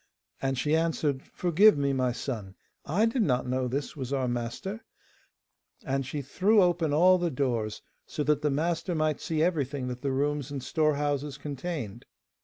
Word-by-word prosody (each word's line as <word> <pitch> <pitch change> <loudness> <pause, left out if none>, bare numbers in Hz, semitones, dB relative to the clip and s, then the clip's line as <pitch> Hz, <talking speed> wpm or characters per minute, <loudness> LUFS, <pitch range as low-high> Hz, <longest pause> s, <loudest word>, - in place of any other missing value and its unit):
And 135 -1 0
she 150 +4 +1
answered, 160 -4 0
'Forgive 185 +3 +5
me, 140 -1 +1
my 130 -2 +1
son. 110 -6 -5 0.3
I 195 +9 +3
did 230 +2 +1
not 130 - +1
know 130 0 0
this 140 +3 -3
was 135 -3 -5
our 135 -2 0
master,' 120 - -4 1.0
and 135 0 0
she 145 +1 -4
threw 200 - +3
open 175 -4 +3
all 180 +5 +5
the 175 -1 0
doors 120 -7 -2 0.2
so 150 - -2
that 150 0 +2
the 150 - +1
master 165 +5 -1
might 155 -1 0
see 160 -1 0
everything 145 -6 -1
that 125 0 -6
the 140 -1 -1
rooms 145 0 -1
and 140 -3 -5
storehouses 145 -1 0
contained. 140 - -5
145 Hz, 170 wpm, -28 LUFS, 130-165 Hz, 1.0 s, Forgive